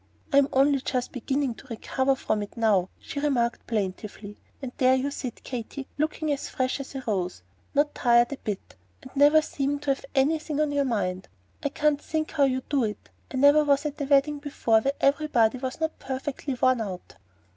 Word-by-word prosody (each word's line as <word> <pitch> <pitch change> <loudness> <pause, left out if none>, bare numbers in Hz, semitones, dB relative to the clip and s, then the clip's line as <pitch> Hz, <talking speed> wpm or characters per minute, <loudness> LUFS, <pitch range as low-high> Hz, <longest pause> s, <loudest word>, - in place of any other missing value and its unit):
"I - - +6
am 275 - +3
only 275 +1 +4
just 250 -1 -2
beginning 270 +1 -1
to 260 - -16
recover 260 +3 0
from 215 -5 -1
it 205 +3 -8
now," 205 -5 +2
she 285 - -6
remarked 250 -5 0
plaintively, 205 0 -4 0.2
"and 265 -3 -6
there 255 0 +5
you 270 +2 -1
sit, 250 -4 -6
Katy, 255 +2 -6
looking 310 0 0
as 285 - -2
fresh 255 +1 -1
as 275 0 -8
a 265 - -4
rose; 185 - -2 0.3
not 290 +1 +2
tired 240 0 +4
a - - -6
bit, 210 -6 -6 0.3
and 260 - -13
never 295 +2 +6
seeming 285 -1 -1
to 290 -1 +1
have 270 - -11
anything 300 +2 +1
on 305 -1 +1
your 285 -1 +1
mind. 190 -6 -2 0.3
I 285 - -1
can't 295 0 +1
think 315 -1 -2
how 290 -3 +3
you 260 -1 0
do 280 -4 +1
it. 210 -2 -4 0.2
I 260 - -3
never 285 +3 +6
was 285 0 +2
at 295 0 -4
a - - 0
wedding 285 +1 +3
before 240 -6 +1
where 275 +4 0
everybody 275 -5 +2
was 260 +2 -4
not 320 0 -2
perfectly 270 +1 -4
worn 255 -1 +3
out." 190 -4 -7
270 Hz, 200 wpm, -26 LUFS, 235-285 Hz, 0.3 s, I